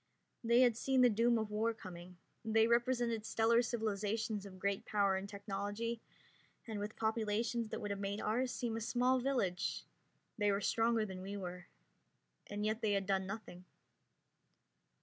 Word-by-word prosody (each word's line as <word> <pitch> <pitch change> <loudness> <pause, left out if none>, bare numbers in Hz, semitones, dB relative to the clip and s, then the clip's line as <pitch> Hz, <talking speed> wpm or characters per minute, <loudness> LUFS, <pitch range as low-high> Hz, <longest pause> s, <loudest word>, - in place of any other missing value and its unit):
They 235 +2 +5
had 245 -3 +5
seen 265 +2 +2
the 245 -1 +6
doom 230 +2 +3
of 220 -1 -2
war 225 +2 0
coming. 180 -2 -10 0.3
They 220 0 +4
represented 235 -1 +2
stellar 225 +2 +3
civilizations 215 -2 -1
of 185 -1 -11
great 200 +1 -1
power 200 -2 +2
and 190 +1 -4
technology, 205 +3 -3 0.6
and 220 -3 -4
with 205 +1 -4
populations 225 +1 0
that - - -4
would 205 -1 -3
have 200 - -3
made 200 +1 -2
ours 245 +4 0
seem 235 -3 -2
a 225 - -3
small 250 +3 +2
village; 240 -9 -1 0.5
they 205 -1 +3
were 200 - +1
stronger 225 +2 +2
than 190 -2 -7
we 200 +2 -5
were, 180 -2 -6 0.8
and 205 +1 -3
yet 215 +2 0
they 215 -2 +2
had 195 -1 +1
done 190 -1 0
nothing. 195 -3 -7
215 Hz, 165 wpm, -36 LUFS, 200-230 Hz, 0.8 s, the